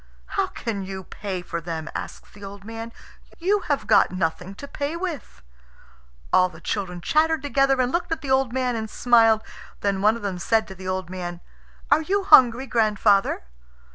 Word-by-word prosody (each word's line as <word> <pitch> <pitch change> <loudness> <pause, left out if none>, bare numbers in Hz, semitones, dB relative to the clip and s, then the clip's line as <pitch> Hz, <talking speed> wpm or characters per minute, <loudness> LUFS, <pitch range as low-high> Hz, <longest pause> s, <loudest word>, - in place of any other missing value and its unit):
"How 390 -1 0
can 225 - -4
you 190 0 -6
pay 185 0 -6
for 170 -1 -5
them?" 160 -1 -5
asks - - -7
the 205 - -14
old 200 0 -9
man. 225 +1 -7 0.5
"You 395 +5 +1
have 285 -6 0
got 215 0 +5
nothing 180 +1 -3
to 280 - -9
pay 285 +3 -4
with." 335 - -6 0.9
All 185 0 +5
the 160 - -14
children 180 -1 -4
chattered 315 - +2
together, 275 -2 +2
and 255 0 +1
looked 345 -1 -2
at 325 - -1
the 270 -1 -4
old 265 -2 +2
man 250 -1 -1
and 220 -1 -4
smiled. 225 -2 +4 0.4
Then 200 -1 0
one 215 +2 +4
of 235 - -9
them 190 -3 -3
said 220 +5 +1
to - - -7
the 185 0 -9
old 185 -1 -3
man, 175 -2 -5 0.5
"Are 315 - +5
you 395 +5 0
hungry, 255 -6 +6
grandfather?" 210 - +2
220 Hz, 185 wpm, -24 LUFS, 190-270 Hz, 0.9 s, hungry